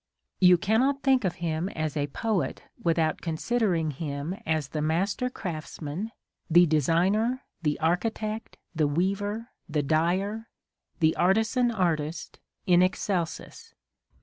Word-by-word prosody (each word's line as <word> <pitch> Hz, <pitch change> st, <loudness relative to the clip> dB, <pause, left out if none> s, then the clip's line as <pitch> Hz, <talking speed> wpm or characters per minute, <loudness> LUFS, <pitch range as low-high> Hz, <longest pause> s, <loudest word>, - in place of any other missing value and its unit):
You 180 Hz, -1 st, +7 dB
cannot 255 Hz, +10 st, +1 dB
think 265 Hz, -3 st, +4 dB
of 180 Hz, -, 0 dB
him 165 Hz, +3 st, -1 dB
as 155 Hz, -3 st, -3 dB
a 145 Hz, -1 st, 0 dB
poet 180 Hz, -1 st, -2 dB, 0.2 s
without 165 Hz, -2 st, +1 dB
considering 170 Hz, -1 st, 0 dB
him 145 Hz, +2 st, -4 dB
as 155 Hz, -3 st, 0 dB
the 155 Hz, -, -3 dB
master 190 Hz, +10 st, 0 dB
craftsman, 165 Hz, -, -5 dB, 0.4 s
the 175 Hz, +2 st, +7 dB
designer, 180 Hz, -, +2 dB
— -, -, -50 dB
the 150 Hz, -3 st, 0 dB
architect, 215 Hz, +6 st, -1 dB
— -, -, -50 dB
the 155 Hz, -2 st, +2 dB
weaver, 200 Hz, -, -1 dB
— -, -, -43 dB
the 150 Hz, -, +2 dB
dyer, 185 Hz, +9 st, 0 dB, 0.3 s
— -, -, -46 dB
the 160 Hz, 0 st, +4 dB
artisan 220 Hz, +6 st, +3 dB
artist 165 Hz, -7 st, -2 dB, 0.3 s
in 180 Hz, -2 st, +5 dB
excelsis. 185 Hz, -, -2 dB
175 Hz, 135 wpm, -27 LUFS, 155-215 Hz, 0.4 s, You